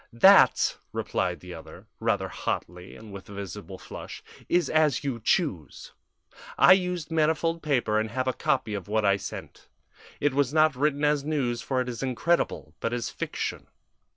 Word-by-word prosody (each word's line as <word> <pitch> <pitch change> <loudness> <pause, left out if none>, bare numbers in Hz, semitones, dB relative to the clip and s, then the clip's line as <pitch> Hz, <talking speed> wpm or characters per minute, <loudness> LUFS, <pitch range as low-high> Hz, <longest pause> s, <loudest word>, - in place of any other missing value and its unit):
"That," 190 +12 +6
replied - - -2
the - - -9
other, - - -11
rather - - 0
hotly 90 +1 -5
and 110 -2 -12
with 100 0 -10
a - - -9
visible 100 0 -7
flush, - - -9 0.3
"is 175 -4 +2
as 155 -3 +2
you 130 -5 -3
choose. 95 - -1 0.7
I - - +8
used 180 -4 -1
manifold 165 +1 +1
paper 120 -8 +1
and 110 0 -2
have 130 +3 -2
a 130 - +1
copy 110 - -1
of 100 -4 -5
what 110 0 0
I 100 0 +4
sent. - - -9 0.5
It 145 -2 +1
was 140 -1 +1
not 155 -2 +4
written 145 +2 0
as 145 -1 +2
news, 135 -6 -1
for 130 -2 -1
it 125 - -4
is 120 -2 -5
incredible, 135 +7 0
but 115 - -2
as 120 -1 -3
fiction. - - -4
130 Hz, 170 wpm, -27 LUFS, 110-155 Hz, 0.7 s, I